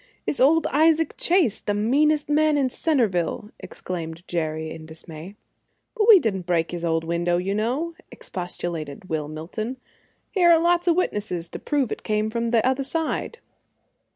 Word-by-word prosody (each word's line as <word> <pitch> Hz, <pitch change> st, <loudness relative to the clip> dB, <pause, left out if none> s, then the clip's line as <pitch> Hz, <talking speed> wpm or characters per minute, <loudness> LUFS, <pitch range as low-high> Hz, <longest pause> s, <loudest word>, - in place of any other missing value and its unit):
"It's 285 Hz, -, -2 dB
old 315 Hz, +5 st, +4 dB
Isaac 320 Hz, +2 st, +3 dB
Chase, 340 Hz, -, +2 dB
the 205 Hz, -, -2 dB
meanest 290 Hz, +8 st, +2 dB
man 300 Hz, 0 st, +3 dB
in 270 Hz, -2 st, +2 dB
Centerville!" 215 Hz, -, 0 dB
exclaimed 165 Hz, -1 st, -7 dB
Jerry, 160 Hz, -2 st, -2 dB
in 160 Hz, -1 st, -9 dB
dismay. 160 Hz, +3 st, -10 dB, 0.6 s
"But 435 Hz, -2 st, +1 dB
we 430 Hz, -, +11 dB
didn't 195 Hz, -, -2 dB
break 170 Hz, -2 st, +1 dB
his 175 Hz, -1 st, -5 dB
old 165 Hz, -1 st, 0 dB
window, 170 Hz, +1 st, 0 dB
you 185 Hz, +3 st, -1 dB
know," 255 Hz, +11 st, -1 dB, 0.2 s
expostulated 175 Hz, -3 st, -6 dB
Will 155 Hz, -2 st, -2 dB
Milton. 185 Hz, -, -5 dB, 0.5 s
"Here 360 Hz, -4 st, +4 dB
are 335 Hz, -1 st, +7 dB
lots 345 Hz, +1 st, +2 dB
of 340 Hz, -, +4 dB
witnesses 205 Hz, -, -2 dB
to -, -, -7 dB
prove 280 Hz, -6 st, -1 dB
it -, -, -4 dB
came 215 Hz, 0 st, -1 dB
from 235 Hz, 0 st, -1 dB
the 230 Hz, -1 st, +2 dB
other 260 Hz, +1 st, +1 dB
side." 325 Hz, -, -2 dB
215 Hz, 160 wpm, -24 LUFS, -, 0.6 s, we